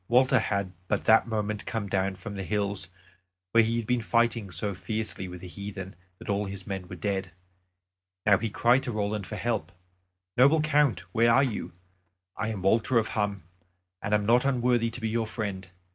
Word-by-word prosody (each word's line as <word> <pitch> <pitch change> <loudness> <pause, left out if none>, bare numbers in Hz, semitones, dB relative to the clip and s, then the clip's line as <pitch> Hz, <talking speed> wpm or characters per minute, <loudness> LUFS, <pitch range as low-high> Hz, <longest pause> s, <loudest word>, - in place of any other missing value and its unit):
Walter 130 +1 +4
had 100 -3 -1
but - - 0
that 110 +1 +5
moment 105 -2 -2
come 110 -3 -2
down 95 0 0
from 100 +3 -8
the 100 - -4
hills 100 -3 -1 0.6
where 115 0 +6
he 115 +1 0
had 115 - -2
been 125 0 +1
fighting 115 -2 +1
so 95 +4 -2
fiercely 110 0 -3
with 90 -1 -9
the 90 - -8
heathen 95 0 -7 0.2
that - - -12
all 100 0 0
his 95 -1 -7
men 95 -2 -5
were 95 - -7
dead; 95 -1 -2 0.9
now 100 -2 +5
he 115 0 -2
cried 120 +5 +3
to 130 - -3
Roland 105 -2 -2
for - - -5
help. 115 -4 -2 0.7
"Noble 140 +6 +6
Count, 150 - +2
where 115 +1 +4
are 135 +4 +5
you? 115 -9 -3 0.6
I 100 - -2
am 105 -4 -4
Walter 115 +5 +3
of 110 -2 +2
Hum, 100 -3 -1 0.6
and 105 - +1
am 105 -1 0
not 120 +3 +4
unworthy 125 -3 +2
to 115 - -7
be 110 - 0
your 115 0 0
friend. 100 -4 -4
105 Hz, 190 wpm, -28 LUFS, 100-115 Hz, 0.9 s, where